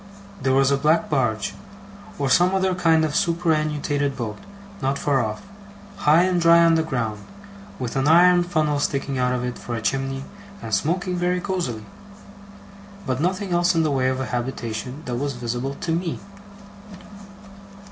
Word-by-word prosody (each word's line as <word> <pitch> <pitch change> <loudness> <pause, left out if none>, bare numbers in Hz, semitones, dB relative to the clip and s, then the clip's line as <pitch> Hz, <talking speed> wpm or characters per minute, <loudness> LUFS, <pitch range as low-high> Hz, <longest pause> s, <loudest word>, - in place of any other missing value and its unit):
There 130 0 +1
was 135 0 +3
a 140 - +3
black 155 +4 +1
barge, 120 -7 0 0.6
or 140 - -1
some 180 +7 +4
other 190 -1 +1
kind 165 -3 +3
of 150 -1 -3
superannuated 155 -5 0
boat, 110 -4 -5 0.4
not 135 +1 0
far 135 -4 +1
off, 110 -1 -5 0.5
high 155 +4 +4
and 180 -1 +1
dry 170 0 +6
on 165 - +5
the 165 - +3
ground, 115 -9 -3 0.5
with 125 -3 -5
an 135 +1 +1
iron 175 +2 +6
funnel 155 -4 0
sticking 135 -2 -2
out 125 0 +1
of 125 -1 -1
it 125 0 -4
for 120 - -5
a - - -2
chimney 135 +2 -2 0.3
and 110 - -7
smoking 180 - 0
very 180 +1 0
cosily; 175 - -3 1.2
but 130 0 -2
nothing 185 +3 -1
else 175 +1 +2
in 165 - +3
the 155 - 0
way 130 -2 +1
of 130 0 -2
a 130 - -2
habitation 125 +2 -4
that 125 -1 -3
was 140 +2 -2
visible 120 +3 -3
to 165 - -2
me. 170 0 -2
145 Hz, 165 wpm, -23 LUFS, 130-170 Hz, 1.2 s, dry